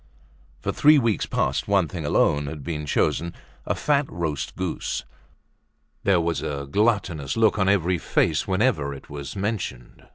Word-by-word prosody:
For - - -1
three 150 +1 +6
weeks 115 - +1
past - - 0
one 100 -4 +3
thing 80 -2 -5
alone 75 0 +2
had 70 0 -6
been 75 -1 -4
chosen—a 85 +3 -2
fat 145 -2 +1
roast 75 -6 -3
goose. 90 -2 -3 1.0
There 95 -3 +4
was 85 -4 -1
a 70 -1 -4
gluttonous 100 - +1
look 110 -2 +3
on 95 0 +3
every 90 -3 +2
face 80 -1 +1
whenever 95 - +1
it 70 - -13
was 70 +3 -6
mentioned. 95 - -4
85 Hz, 150 wpm, -24 LUFS, 75-100 Hz, 1.0 s, three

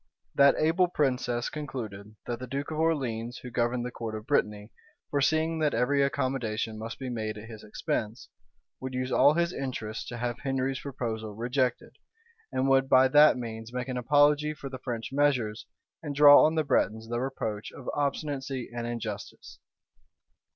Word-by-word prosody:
That 140 0 +6
able 165 +4 +3
princess 125 -6 -1
concluded, 110 -8 -6
that 120 -1 -4
the 130 - -6
duke 140 +4 -4
of 155 - -3
Orleans, 125 -7 -1
who 125 - -9
governed 120 +1 0
the 125 - -4
court 115 -2 -5
of 110 0 -7
Brittany, 105 -6 0 0.4
foreseeing 160 +3 +1
that 150 -4 +1
every 130 +4 +2
accommodation 125 -6 -1
must 115 +1 -6
be 130 - -6
made 110 -3 -3
at 105 +1 -9
his 110 -2 -10
expense, 110 +1 -3 0.5
would 130 0 -5
use 130 0 -2
all 145 +3 +5
his 170 +1 +1
interest 115 -5 -4
to 120 - -6
have 120 0 -3
Henry's 135 -1 -1
proposal 110 -6 -5
rejected; 125 +2 -1 0.5
and 130 +1 0
would 135 0 +3
by 130 0 +6
that 150 +1 +6
means 115 -1 -6
make 125 +1 -4
an 130 - -3
apology 145 +4 +3
for 140 -2 -7
the 130 -1 -7
French 120 -1 -5
measures, 130 -7 +1 0.3
and 145 -3 -5
draw 145 0 +9
on 155 +1 +2
the 160 - +2
Bretons 110 -5 0
the 120 +1 -2
reproach 115 -5 -4
of 130 - -12
obstinacy 140 -3 -2
and 120 0 -3
injustice. 115 -3 -6
130 Hz, 170 wpm, -28 LUFS, 115-140 Hz, 0.5 s, draw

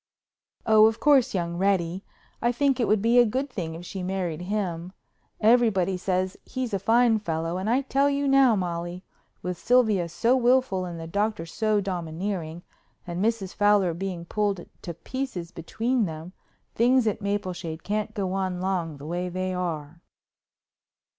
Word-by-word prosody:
"Oh, 220 -1 +7
of 220 0 -1
course, 270 -5 +4
young 170 -1 -2
Reddy. 190 -1 0 0.4
I 240 - +2
think 270 +1 +1
it 235 - +2
would 215 -1 +2
be 235 +2 +5
a - - +8
good 260 +5 -2
thing 165 -7 -4
if 170 +2 -9
she 190 +1 -6
married 180 -3 -3
him. 180 -3 -3 0.5
Everybody 215 -5 +3
says 185 +1 -1
he's 255 -4 -4
a 195 - +1
fine 225 +2 +3
fellow, 165 -2 -2
and 195 +3 -2
I 250 +4 +3
tell 275 +1 +2
you 280 0 0
now, 270 -4 +5
Molly, 175 -1 -3 0.4
with 180 -1 -4
Sylvia 220 -8 +3
so 230 +9 +2
willful 245 -7 +2
and 170 -2 -6
the 165 - -6
doctor 205 +2 -1
so 215 +5 0
domineering 175 -2 -4 0.4
and 175 +2 -3
Mrs. 220 -4 -1
Fowler 205 -4 +3
being 175 -1 -5
pulled 200 -1 -1 0.2
to 170 - -6
pieces 220 -6 -5
between 225 +8 -1
them, 160 +1 -7 0.4
things 250 +1 +3
at 215 0 -1
Mapleshade 185 -5 -3
can't 215 +1 -2
go 190 -2 -2
on 190 -2 -2
long 180 -5 -2
the 140 - -10
way 175 +3 -3
they 185 +1 -3
are." 165 -3 -4
195 Hz, 165 wpm, -26 LUFS, 175-225 Hz, 0.5 s, a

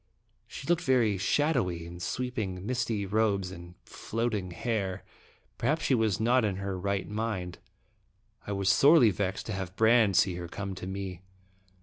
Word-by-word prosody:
She - - -9
looked 175 0 +2
very 115 -7 +2
shadowy 95 - +1
in 85 +1 -9
sweeping, 105 -4 -3
misty 115 -4 -1
robes 100 -2 0
and 85 -1 -11
floating 110 -5 -3
hair. 95 -1 -3 0.6
Perhaps 150 +7 0
she - - +2
was 110 -5 +1
not 120 +3 +3
in 100 -3 0
her 95 0 -3
right 100 +1 -2
mind. 105 -5 -3 0.9
I - - -3
was 100 -1 0
sorely 135 +1 +6
vexed 95 -1 -2
to 110 - -4
have 95 -1 -5
Brande 110 -3 +4
see 90 -1 +3
her 85 -1 -5
come 95 +2 -5
to 95 0 -7
me. 95 -2 -5
100 Hz, 155 wpm, -29 LUFS, 95-115 Hz, 0.9 s, sorely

